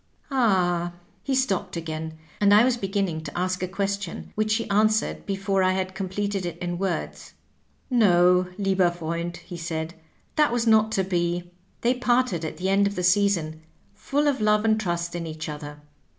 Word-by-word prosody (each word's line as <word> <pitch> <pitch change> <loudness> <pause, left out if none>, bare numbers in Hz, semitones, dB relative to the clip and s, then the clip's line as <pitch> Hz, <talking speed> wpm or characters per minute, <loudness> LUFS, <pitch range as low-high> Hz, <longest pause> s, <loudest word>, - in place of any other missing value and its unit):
Ahl" 180 -9 +2 0.3
He 275 - -1
stopped 200 -8 0
again, 160 -1 -5 0.2
and 205 0 +5
I 215 - +7
was 255 -1 +2
beginning 195 -6 -2
to - - -6
ask 185 +1 -1
a 185 - -1
question, 200 -1 -3
which 215 0 +1
he 230 - -2
answered 215 +2 +1
before 195 -1 0
I 185 0 +3
had 190 0 -2
completed 195 +1 -2
it 175 -2 -4
in 175 0 -4
words. 190 -3 -4 0.5
"No, 180 -6 +4
lieber 195 -3 +2
FTernid^^ 170 0 -4
he 175 - -9
said; 165 -1 -4 0.4
"that 300 -4 +4
was 240 -1 0
not 220 -1 +4
to 190 - +2
be. 175 -1 -1 0.3
They 240 +2 +3
parted 250 -8 +1
at 155 -1 -5
the 185 +3 -1
end 200 +1 +4
of 200 - -4
the 180 - -2
season, 175 -4 +2 0.3
full 290 +2 -1
of 275 -5 +1
love 210 0 +3
and 220 0 +3
trust 170 -3 -2
in 170 -1 -4
each 155 0 -6
other. 150 -1 -7
190 Hz, 180 wpm, -25 LUFS, 175-210 Hz, 0.5 s, I